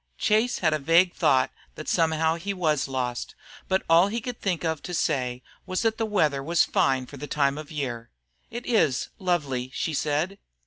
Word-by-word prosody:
Chase 220 Hz, +4 st, +2 dB
had 160 Hz, -3 st, +2 dB
a 155 Hz, -, 0 dB
vague 170 Hz, +5 st, +4 dB
thought 130 Hz, -1 st, +3 dB, 0.2 s
that 155 Hz, -, -8 dB
somehow 160 Hz, -1 st, +2 dB
he 195 Hz, +4 st, -4 dB
was 155 Hz, -7 st, +1 dB
lost, 125 Hz, -2 st, -3 dB, 0.3 s
but 190 Hz, 0 st, +1 dB
all 170 Hz, +3 st, +6 dB
he 225 Hz, +3 st, -2 dB
could 245 Hz, +1 st, -6 dB
think 180 Hz, -4 st, -1 dB
of 160 Hz, -2 st, -1 dB
to 180 Hz, -, -5 dB
say 125 Hz, -4 st, -1 dB, 0.2 s
was 185 Hz, +3 st, -1 dB
that 225 Hz, 0 st, +1 dB
the 225 Hz, -, 0 dB
weather 155 Hz, -10 st, +1 dB
was 165 Hz, +4 st, +3 dB
fine 130 Hz, -1 st, +1 dB
for 140 Hz, -, -11 dB
the 145 Hz, -, -6 dB
time 140 Hz, -2 st, +1 dB
of 150 Hz, 0 st, -8 dB
year. 120 Hz, -6 st, -4 dB, 0.4 s
"It 240 Hz, +1 st, -6 dB
is 160 Hz, -, +2 dB
lovely," 145 Hz, -9 st, -1 dB
she 160 Hz, -, -2 dB
said. 155 Hz, +7 st, -1 dB
160 Hz, 190 wpm, -26 LUFS, 140-185 Hz, 0.4 s, all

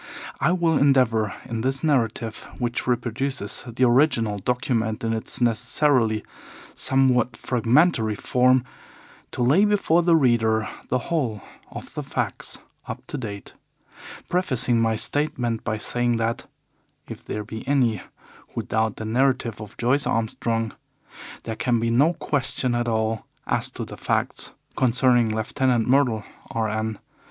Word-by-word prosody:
I 145 Hz, +5 st, +3 dB
will 170 Hz, -4 st, +2 dB
endeavour 125 Hz, -6 st, +3 dB
in 115 Hz, -3 st, -3 dB
this 135 Hz, +2 st, -1 dB
narrative, 115 Hz, -6 st, 0 dB
which 120 Hz, 0 st, -2 dB
reproduces 125 Hz, -1 st, -2 dB
the 120 Hz, +2 st, -1 dB
original 120 Hz, -5 st, +3 dB
document 115 Hz, -1 st, -1 dB
in 115 Hz, 0 st, 0 dB
its 110 Hz, -, -2 dB
necessarily 120 Hz, -1 st, +2 dB, 0.5 s
somewhat 125 Hz, -3 st, +2 dB
fragmentary 120 Hz, -1 st, +2 dB
form, 125 Hz, +3 st, +3 dB, 0.7 s
to -, -, -2 dB
lay 145 Hz, +11 st, +5 dB
before 200 Hz, -5 st, +3 dB
the 170 Hz, -1 st, +4 dB
reader 115 Hz, -6 st, +2 dB, 0.2 s
the 130 Hz, -, +2 dB
whole 125 Hz, -, -2 dB, 0.3 s
of -, -, -9 dB
the -, -, -3 dB
facts -, -, -4 dB, 0.3 s
up -, -, -7 dB
to -, -, -4 dB
date, 100 Hz, -5 st, -7 dB, 0.7 s
prefacing 130 Hz, -10 st, +1 dB
my 115 Hz, -1 st, +2 dB
statement 120 Hz, -2 st, -1 dB
by 110 Hz, -2 st, -1 dB
saying 120 Hz, +2 st, 0 dB
that, 115 Hz, 0 st, -2 dB, 0.6 s
if -, -, -9 dB
there 105 Hz, -, -4 dB
be 110 Hz, +1 st, -7 dB
any 125 Hz, -7 st, +2 dB, 0.5 s
who -, -, -2 dB
doubt 110 Hz, -1 st, 0 dB
the 110 Hz, -, -6 dB
narrative 125 Hz, -1 st, +1 dB
of 105 Hz, -1 st, -10 dB
Joyce 130 Hz, +4 st, +1 dB
Armstrong, 115 Hz, 0 st, -1 dB, 0.7 s
there 110 Hz, -, -4 dB
can 120 Hz, 0 st, +1 dB
be 115 Hz, 0 st, 0 dB
no 145 Hz, +8 st, +4 dB
question 130 Hz, -4 st, 0 dB
at 120 Hz, 0 st, 0 dB
all 110 Hz, -1 st, -1 dB, 0.2 s
as -, -, -1 dB
to -, -, -6 dB
the -, -, -10 dB
facts -, -, -1 dB, 0.2 s
concerning 125 Hz, -2 st, +3 dB
Lieutenant 120 Hz, +1 st, +1 dB
Myrtle, 125 Hz, -5 st, +3 dB, 0.3 s
R. 110 Hz, -1 st, -1 dB
N. 110 Hz, 0 st, -2 dB
120 Hz, 140 wpm, -24 LUFS, 110-130 Hz, 0.7 s, lay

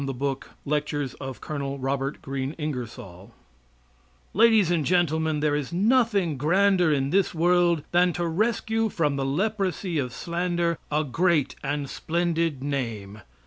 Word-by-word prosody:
INGERSOLL'S 135 Hz, 0 st, -3 dB, 0.2 s
LECTURE 150 Hz, 0 st, -1 dB, 0.2 s
ON 135 Hz, +2 st, -5 dB
THE 135 Hz, +1 st, -1 dB
GREAT 135 Hz, +1 st, -3 dB
INFIDELS 120 Hz, -, -6 dB, 1.0 s
Ladies 220 Hz, -4 st, +5 dB
and 165 Hz, -3 st, +1 dB
Gentlemen: 160 Hz, -2 st, +1 dB
There 150 Hz, -1 st, +2 dB
is 145 Hz, -3 st, -3 dB
nothing 200 Hz, -, +2 dB
grander 180 Hz, +2 st, +3 dB
in 135 Hz, -1 st, 0 dB
this 190 Hz, -1 st, +2 dB
world 170 Hz, -1 st, +3 dB
than 175 Hz, +1 st, +4 dB
to 175 Hz, +1 st, -2 dB
rescue 220 Hz, +5 st, 0 dB
from 150 Hz, -7 st, 0 dB
the 135 Hz, -1 st, -1 dB
leprosy 185 Hz, +1 st, -1 dB
of 125 Hz, -3 st, -2 dB
slander 170 Hz, +2 st, -1 dB
a 150 Hz, +1 st, +2 dB
great 165 Hz, +1 st, +1 dB
and 145 Hz, 0 st, -2 dB
splendid 165 Hz, -3 st, -1 dB
name. 115 Hz, -7 st, -4 dB
155 Hz, 130 wpm, -25 LUFS, 140-175 Hz, 1.0 s, Ladies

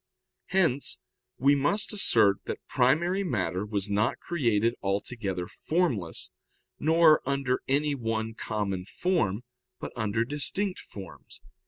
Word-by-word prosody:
Hence 165 Hz, -8 st, +1 dB, 0.4 s
we 140 Hz, +3 st, +4 dB
must 145 Hz, +11 st, +1 dB
assert 110 Hz, -, +3 dB
that -, -, -6 dB
primary 170 Hz, +10 st, +2 dB
matter 95 Hz, -, -1 dB
was 100 Hz, -1 st, -2 dB
not 105 Hz, +3 st, +1 dB
created 115 Hz, -9 st, +1 dB
altogether 100 Hz, -2 st, -2 dB
formless, 140 Hz, -, -1 dB, 0.5 s
nor 160 Hz, 0 st, +5 dB
under 135 Hz, -2 st, 0 dB
any 145 Hz, +2 st, +1 dB
one 115 Hz, -3 st, -2 dB
common 100 Hz, -4 st, -3 dB
form, 125 Hz, -, 0 dB, 0.4 s
but -, -, -6 dB
under 110 Hz, 0 st, 0 dB
distinct 180 Hz, -, -1 dB
forms. 100 Hz, -2 st, -11 dB
125 Hz, 115 wpm, -28 LUFS, 105-155 Hz, 0.5 s, nor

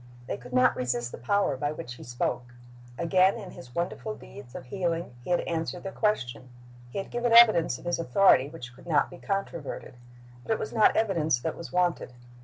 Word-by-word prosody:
They -, -, -3 dB
could 125 Hz, +1 st, -12 dB
not 125 Hz, 0 st, +4 dB
resist 120 Hz, -1 st, -2 dB
the -, -, -8 dB
power 195 Hz, -, +1 dB
by 145 Hz, +3 st, -1 dB
which 150 Hz, -6 st, -7 dB
He -, -, -12 dB
spoke. 120 Hz, 0 st, -3 dB, 0.4 s
Again 185 Hz, +4 st, +3 dB
in 200 Hz, -6 st, -8 dB
His 125 Hz, -1 st, -13 dB
wonderful 180 Hz, +5 st, -3 dB
deeds 125 Hz, -2 st, -13 dB
of -, -, -7 dB
healing 170 Hz, -1 st, -2 dB
He -, -, -9 dB
had 175 Hz, -, +3 dB
answered 165 Hz, +1 st, -3 dB
their 195 Hz, -, -4 dB
question. 130 Hz, -, -1 dB, 0.4 s
He -, -, -7 dB
had 195 Hz, -, -4 dB
given 240 Hz, -1 st, 0 dB
evidence 215 Hz, -, +7 dB
of -, -, -15 dB
His 175 Hz, 0 st, -1 dB
authority 140 Hz, -2 st, +4 dB
which 125 Hz, -7 st, -9 dB
could 130 Hz, -, -16 dB
not 150 Hz, -4 st, +2 dB
be 175 Hz, -, -11 dB
controverted. 195 Hz, -7 st, -4 dB, 0.5 s
But 225 Hz, -, -1 dB
it -, -, -1 dB
was -, -, -5 dB
not 220 Hz, -2 st, +5 dB
evidence 170 Hz, -, +2 dB
that 160 Hz, -, -2 dB
was 170 Hz, -, -9 dB
wanted. 180 Hz, -7 st, 0 dB
165 Hz, 205 wpm, -28 LUFS, 125-195 Hz, 0.5 s, evidence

